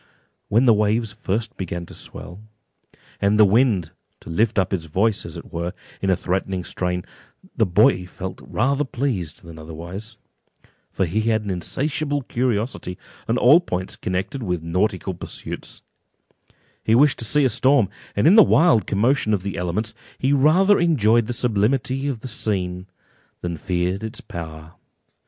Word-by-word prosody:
When 115 +5 +3
the 120 - +7
waves 105 +1 +1
first 110 +2 -3
began 85 -2 -4
to - - -13
swell, 90 +4 -10 0.8
and 100 +1 +3
the 105 - +7
wind 100 -5 +2 0.3
to - - -9
lift 110 +6 +1
up 95 0 +1
its 85 -4 -2
voice, 100 +7 0
as - - -8
it - - -11
were, 85 +2 -3 0.3
in 95 - 0
a 95 - +4
threatening 95 +1 -2
strain, 90 0 -2 0.5
the 110 -4 +2
boy 90 -1 +3
felt 95 +1 -7
rather 140 +6 0
pleased 120 - -3
than 85 -2 -11
otherwise; 85 +8 -8 0.7
for - - 0
as 85 - -2
he 110 +4 +1
had 110 -1 +1
an 100 - -3
insatiable 140 - -2
curiosity 115 -6 -2 0.3
on 115 - +1
all 140 +8 +7
points 95 - -4
connected 95 +10 -3
with 90 -6 -2
nautical 95 +3 -1
pursuits, 85 - -7 1.0
he 110 - +3
wished 145 +2 +4
to 115 - -2
see 145 +6 +3
a - - +6
storm, 130 -1 +3 0.3
and 100 - +1
in 165 - +7
the 220 - +10
wild 165 - +4
commotion 110 +1 +2
of 95 - -5
the 100 -1 -4
elements, 90 +6 -2 0.2
he 135 +2 +1
rather 175 +9 +4
enjoyed 120 -9 +3
the - - -2
sublimity 125 +4 0
of 130 -6 -3
the 130 - -6
scene 95 -5 -1 0.5
than 85 -1 -3
feared 90 +4 -2
its 110 - -5
power. 80 -1 -8
105 Hz, 165 wpm, -22 LUFS, 90-125 Hz, 1.0 s, the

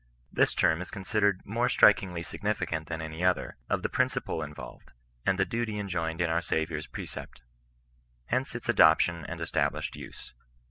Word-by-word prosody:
This - - +3
term 80 +2 +3
is 90 - -6
considered 100 0 0
more 115 +4 0
strudngly 90 -7 +4
significant 80 0 -2
than 80 -1 -4
any 80 +2 -5
other, 90 0 +1
of - - 0
the - - +2
principle 130 +1 0
iDYoWed, 75 0 -7 0.5
and 95 - +3
the 95 - +3
duty 110 +2 -2
enjoined 85 -4 -2
in 85 - +2
our 85 +1 +2
Saviour's 80 -2 -2
precept. - - -8 0.8
Hence 130 - -1
its 120 0 -6
adoption 85 -5 +5
and - - -6
established - - -1
use. - - -10
90 Hz, 155 wpm, -29 LUFS, 80-105 Hz, 0.8 s, adoption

